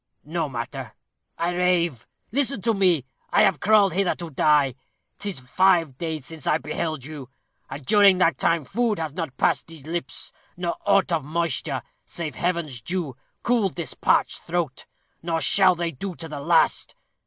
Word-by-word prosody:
No 160 0 -2
matter 125 -1 -6 0.4
I 175 +1 -1
rave. 175 -8 +1 0.2
Listen 270 -3 0
to 230 - +3
me. 180 - +2 0.2
I - - +4
have 195 -6 +3
crawled 205 -1 +4
hither 190 0 +1
to 170 -2 -8
die. 145 -1 +3 0.5
'Tis 200 -7 -4
five 165 +1 +3
days 160 -5 -3
since 160 -2 -9
I 155 - +4
beheld 155 -2 -3
you, 145 -4 -8 0.4
and 135 +1 -7
during 200 +2 +6
that 170 -2 +2
time 165 -4 +1
food 230 - 0
has 160 -3 -3
not 160 -5 -5
passed - - +1
these 160 -4 -12
lips, 170 +2 -4 0.3
nor 175 -1 -2
aught 200 -2 +4
of 165 -3 +1
moisture, 165 0 -2 0.2
save 160 -3 -5
Heaven's 170 -8 -2
dew, 170 -2 -3 0.3
cooled 230 -7 +1
this 170 -3 -4
parched - - +2
throat, 165 -6 -3 0.3
nor 165 -1 -1
shall 185 +2 +4
they 170 0 -2
to 180 +6 -6
the 155 -3 -6
last. 165 +2 +2
170 Hz, 165 wpm, -24 LUFS, 150-185 Hz, 0.5 s, during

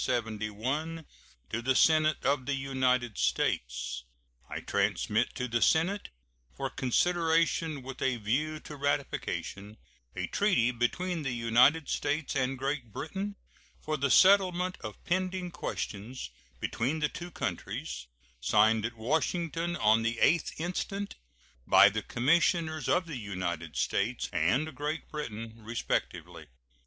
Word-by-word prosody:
To 120 +7 -2 0.6
the 130 +2 +1
Senate 155 0 +4
of 135 -2 +1
the 140 - +1
United 130 -4 0
States: - - -1 0.5
I - - -4
transmit 110 +3 0
to 125 - -2
the 115 -1 0
Senate, 180 +6 +2 0.5
for - - -3
consideration 165 +1 +1
with 130 0 -8
a 130 -2 +1
view 145 +9 -1
to 150 - -9
ratification, 135 -7 -2 0.4
a - - -2
treaty 180 - +2
between 165 +9 -1
the 135 -4 -2
United 125 +7 +4
States 150 -2 -1
and 130 0 0
Great 135 -3 -3
Britain 195 - -4 0.4
for 155 - -2
the 140 -1 0
settlement 185 +1 +5
of 105 -2 -6
pending 185 0 -1
questions 105 - -5 0.3
between 130 - -1
the 150 -1 +1
two 175 0 -7
countries, 60 - -4 0.3
signed 110 - +3
at 115 0 -12
Washington 165 +7 -1
on 110 -4 +4
the 115 +1 0
8th 170 -2 +2
instant 195 +4 -3 0.5
by 100 - +8
the 110 +2 -2
commissioners 155 - +1
of 180 0 +3
the 155 -5 -5
United 85 -6 -4
States - - 0
and 130 - +1
Great 150 +2 -3
Britain, 115 -7 -6
respectively. 115 +1 -3
135 Hz, 125 wpm, -30 LUFS, 115-165 Hz, 0.6 s, by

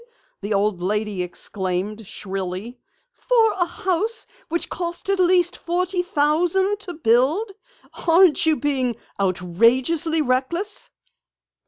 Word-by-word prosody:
the 205 +2 -5
old 200 -2 0
lady 210 0 -1
exclaimed 190 +3 -4
shrilly. 195 +5 -5 0.3
"For 460 -3 +2
a 350 -3 0
house 380 +6 -2 0.2
which 340 +2 -1
cost 345 +2 -3
at 390 - 0
least 360 -1 +4
forty 360 +1 -1
thousand 355 +5 +1
to 365 -4 -6
build! 300 - +2 0.6
Aren't 335 -2 +5
you 315 - +4
being 265 -5 -1 0.3
outrageously 235 - +2
reckless?" 295 +11 -1
300 Hz, 110 wpm, -22 LUFS, -, 0.6 s, Aren't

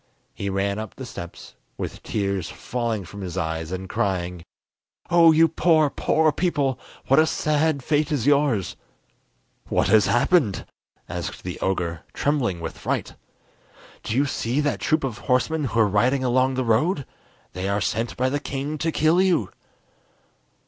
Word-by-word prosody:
He 100 - -4
ran 100 +1 -1
up 110 - -7
the 130 - -7
steps, 85 -7 -9 0.2
with - - -5
tears 100 -4 -2
falling 115 -5 -3
from 100 +4 -9
his 90 -1 -5
eyes, 80 -2 -2
and 95 0 -4
crying: 90 -3 -2 0.7
"Oh, 170 -1 +7
you 160 +1 +5
poor, 160 -2 +3
poor 160 -1 +2
people, 145 -7 0 0.3
what 135 +3 +4
a 160 - +5
sad 155 -2 +1
fate 150 +1 +1
is 135 -6 0
yours!" 140 -10 +2 0.9
"What - - +1
has 110 -3 +5
happened?" 120 - +2 0.4
asked - - -5
the 90 -1 -5
ogre, 85 -4 -1
trembling 130 - 0
with 80 - -6
fright. - - -2 0.9
"Do 110 - -3
you 140 +3 +3
see 130 -1 -1
that 145 -9 -1
troop 155 - +1
of 120 -4 -3
horsemen 145 +6 +1
who 115 -3 -1
are 110 - +5
riding 125 +7 +2
along 130 +1 +2
the 130 0 -1
road? 135 - +1 0.5
They 90 +1 -3
are 100 +1 +1
sent 115 +3 -2
by 130 +1 +1
the 145 +2 -1
king 145 +2 -4
to 165 +2 0
kill 160 +4 +3
you!" 175 - +1
125 Hz, 160 wpm, -24 LUFS, 100-150 Hz, 0.9 s, Oh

